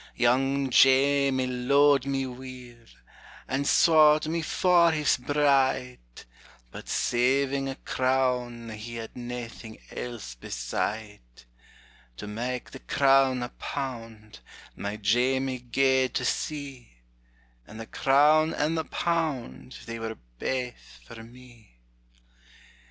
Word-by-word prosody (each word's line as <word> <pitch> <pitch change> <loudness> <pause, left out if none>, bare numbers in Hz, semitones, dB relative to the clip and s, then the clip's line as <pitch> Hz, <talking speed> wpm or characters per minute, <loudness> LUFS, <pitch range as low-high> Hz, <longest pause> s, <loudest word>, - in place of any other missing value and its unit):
Young 135 +2 +1
Jamie 135 0 +4
lo'ed 135 +2 +3
me 135 -1 -1
weel, 125 -2 -10 0.6
and 140 +2 -2
sought 155 -2 +5
me 165 +2 -2
for 170 +1 +3
his 150 -2 +2
bride; 135 -2 +1 0.7
But - - -10
saving 135 +3 +1
a 135 - -5
crown, 125 -3 -1
he 110 +2 -8
had 115 -1 -8
naething 120 -2 -8
else 120 - -7
beside. 105 - -4 1.0
To - - -7
mak' 120 +4 -5
the 135 - -10
crown 135 -2 +2
a 120 - -5
pound, 115 -6 -6 0.4
my 100 +1 -5
Jamie 130 +5 +1
gaed 130 +1 +1
to 125 - -1
sea; 140 - -4 0.7
And 110 - -11
the 115 - -6
crown 150 +6 +3
and 155 +3 0
the 160 -1 -2
pound, 140 - -3
they 115 0 -6
were 110 0 -5 0.2
baith 125 - -5
for 115 - -11
me! 120 - -17
130 Hz, 110 wpm, -27 LUFS, 120-140 Hz, 1.0 s, sought